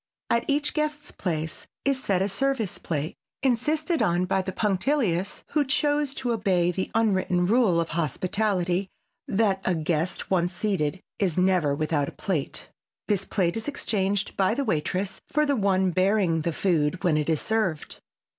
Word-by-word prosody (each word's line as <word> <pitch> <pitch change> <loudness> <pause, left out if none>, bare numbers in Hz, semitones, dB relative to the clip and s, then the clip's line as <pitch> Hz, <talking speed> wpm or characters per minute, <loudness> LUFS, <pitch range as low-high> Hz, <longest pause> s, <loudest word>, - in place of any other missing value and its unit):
At 235 0 +2
each 290 +1 +1
guest's 300 -1 -2
place, 160 -3 -4 0.2
is 270 -1 +1
set 190 -2 +1
a - - +1
"service 235 -2 -1
plate," 155 +3 -3 0.3
insisted 300 +7 +1
on 175 +1 +2
by 190 +1 +1
the 190 0 -4
punctilious 200 - 0
who 300 - +2
choose 290 0 +1
to 250 -2 -1
obey 185 -6 +2
the 185 +2 -3
unwritten 190 -5 +2
rule 210 -4 +3
of 165 - -1
hospitality 180 +3 0 0.4
that 195 -2 +1
a 185 - +1
guest 165 +3 -2
once 175 -1 +2
seated 185 -4 -1 0.2
is 185 -5 0
never 180 -6 +3
without 150 -1 0
a - - -13
plate. 170 -9 -3 0.4
This 195 -2 +1
plate 175 -4 0
is 225 +3 -4
exchanged 205 -8 -1
by 190 +3 +2
the 280 +1 -1
waitress 185 +1 -1
for 300 +1 +1
the 285 -1 +2
one 190 -4 +2
bearing 185 -2 +2
the 170 - -1
food 170 0 0
when 170 -4 +3
it 150 +1 0
is 160 -2 +2
served. 215 -8 -1
190 Hz, 165 wpm, -26 LUFS, 175-225 Hz, 0.4 s, rule